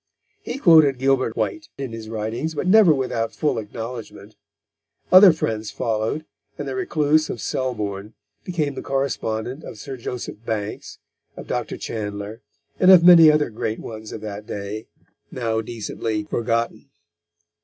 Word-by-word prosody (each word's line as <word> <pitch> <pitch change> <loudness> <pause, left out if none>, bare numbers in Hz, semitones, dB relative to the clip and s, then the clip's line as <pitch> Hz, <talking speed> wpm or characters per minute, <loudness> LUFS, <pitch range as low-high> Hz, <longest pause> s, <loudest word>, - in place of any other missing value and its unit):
He - - -5
quoted 160 - +6
Gilbert 130 -3 +1
White 320 -2 -2
in 135 -3 -5
his 110 -1 -8
writings, 115 +8 -3
but - - -2
never 195 -2 +6
without 125 -5 -1
full 145 -6 0
acknowledgment. 115 +2 -8 0.8
Other 185 0 +10
friends 110 -9 -3
followed, 115 +7 -2 0.3
and - - -5
the - - -3
recluse 155 - +1
of - - -4
Selbourne 105 -5 -3 0.3
became 155 -6 -2
the - - -6
correspondent 135 -1 -2
of - - -9
Sir 135 +5 -7
Joseph 115 -2 -6
Banks, 110 -2 -4 0.4
of - - -8
Dr. - - -3
Chandler, 105 +1 -5 0.4
and 185 - +5
of 185 -3 +9
many 170 -3 +9
other 150 -4 +2
great 110 0 -3
ones 110 -1 -8
of 110 - -7
that 105 -1 -7
day 105 +2 -6 0.4
now 115 -3 -2
decently 110 -1 -4
forgotten. 115 +2 -2
115 Hz, 145 wpm, -22 LUFS, 110-150 Hz, 0.8 s, Other